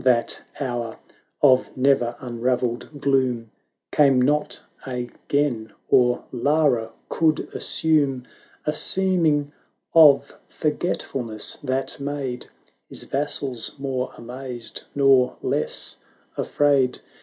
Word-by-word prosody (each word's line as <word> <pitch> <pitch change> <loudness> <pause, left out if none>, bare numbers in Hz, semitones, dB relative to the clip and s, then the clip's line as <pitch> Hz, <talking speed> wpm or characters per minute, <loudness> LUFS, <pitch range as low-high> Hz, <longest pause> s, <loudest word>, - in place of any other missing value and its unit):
that 125 -2 +2 0.2
hour 120 -4 -3 0.5
of 130 -3 +5
ne'er 130 -3 +2
un 120 -2 -7
ravelled 125 -1 0
gloom 130 -5 +1 0.4
Came 135 -3 +4
not 150 +4 +1 0.2
again, 125 -2 -2 0.2
or 125 -1 +3
Lara 130 -3 +1 0.2
could 160 -1 +2
assume 145 -5 +2 0.4
A 150 - +1
seeming 160 -5 +2 0.4
of 155 -4 +6
forgetfulness 135 -8 -2
that 135 0 -3
made 140 -3 -4 0.4
His - - -4
vassals 135 -4 -3
more 135 -2 -3
amazed, 125 -1 -7
nor 135 -3 +4
less - - 0 0.4
afraid. 140 -3 +2
135 Hz, 95 wpm, -23 LUFS, 125-145 Hz, 0.5 s, of